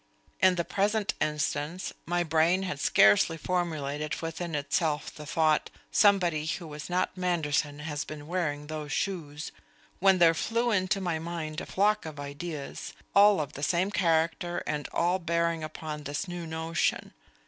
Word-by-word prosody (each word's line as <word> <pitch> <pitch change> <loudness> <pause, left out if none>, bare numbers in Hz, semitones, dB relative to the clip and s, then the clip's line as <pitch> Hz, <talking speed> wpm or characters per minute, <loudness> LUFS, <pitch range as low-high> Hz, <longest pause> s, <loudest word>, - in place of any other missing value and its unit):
In 185 -1 +5
the 170 -1 -1
present 205 +1 0
instance, 150 +3 -1
my 175 +1 +1
brain 165 +3 +2
had 165 -7 -3
scarcely 100 +8 +5
formulated 155 -4 -2
within 165 0 -4
itself 150 +1 -1
the 150 -1 -10
thought, 155 -1 +2 0.2
'Somebody 175 -7 +3
who 175 +1 -3
was 150 0 -8
not 180 +1 0
Manderson 155 -5 0
has 150 -1 -3
been 150 -1 -8
wearing 155 -4 -2
those 150 -1 -5
shoes,' 160 -5 -3 0.5
when 195 0 +5
there 170 -2 +6
flew 230 +8 0
into 195 0 +1
my 175 -4 -1
mind 160 -2 -4
a - - -8
flock 205 -2 +1
of 155 -2 -8
ideas, 145 +1 -6 0.2
all 205 -1 +6
of 150 -3 -3
the 140 - -8
same 175 +6 +1
character 170 -1 +1
and 150 -1 -3
all 175 +2 +1
bearing 170 -1 0
upon 155 -1 -6
this 145 +6 -4
new 175 -1 -5
notion. 160 +1 -1
165 Hz, 155 wpm, -29 LUFS, 150-180 Hz, 0.5 s, there